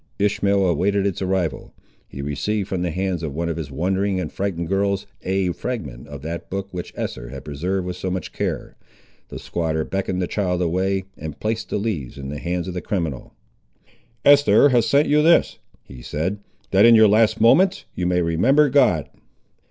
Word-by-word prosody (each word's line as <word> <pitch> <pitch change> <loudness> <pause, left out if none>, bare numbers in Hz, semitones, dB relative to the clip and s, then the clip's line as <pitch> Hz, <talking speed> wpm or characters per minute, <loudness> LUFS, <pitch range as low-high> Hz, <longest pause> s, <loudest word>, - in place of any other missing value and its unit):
Ishmael 100 -1 +2
awaited 95 +4 +1
its 100 -2 -2
arrival. 95 -3 -2 0.3
He 70 - -7
received 90 +9 -2
from 95 -3 -2
the 90 - -1
hands 90 0 -2
of 75 -4 -5
one 85 +1 -2
of 85 - -3
his 80 -4 -5
wondering 95 +6 -1
and 90 - -4
frighted 95 -4 -3
girls 100 +1 0 0.2
a 95 -1 0
fragment 80 - -5
of 70 -1 -9
that 85 +2 -6
book, 100 +1 -4
which 90 -1 -6
Esther - - -5
had 70 +1 -9
preserved 90 +6 -2
with 90 0 -4
so 95 - -4
much 90 0 -4
care. - - -3 0.5
The - - -7
squatter 80 -2 -2
beckoned 95 0 -2
the 90 - 0
child 90 -1 -1
away, 95 +2 0 0.2
and 80 -1 -7
placed 110 0 -2
the - - -1
leaves 100 - -3
in 70 -1 -6
the 75 0 -5
hands 90 +2 -3
of 90 - -4
the 90 - -4
criminal. 80 -10 -4 0.9
"Eest'er 145 0 +6
has 120 -3 +3
sent 140 +6 +3
you 150 +1 +4
this," 170 +2 +3 0.2
he 65 -2 -12
said, 85 +11 -3 0.3
"that, 95 +1 +5
in 115 0 +8
your 110 -1 +7
last 110 +1 +3
moments, 180 - +4
you 90 - -2
may 90 -1 +2
remember 130 - +3
God." 105 - +3
95 Hz, 190 wpm, -22 LUFS, 80-100 Hz, 0.9 s, in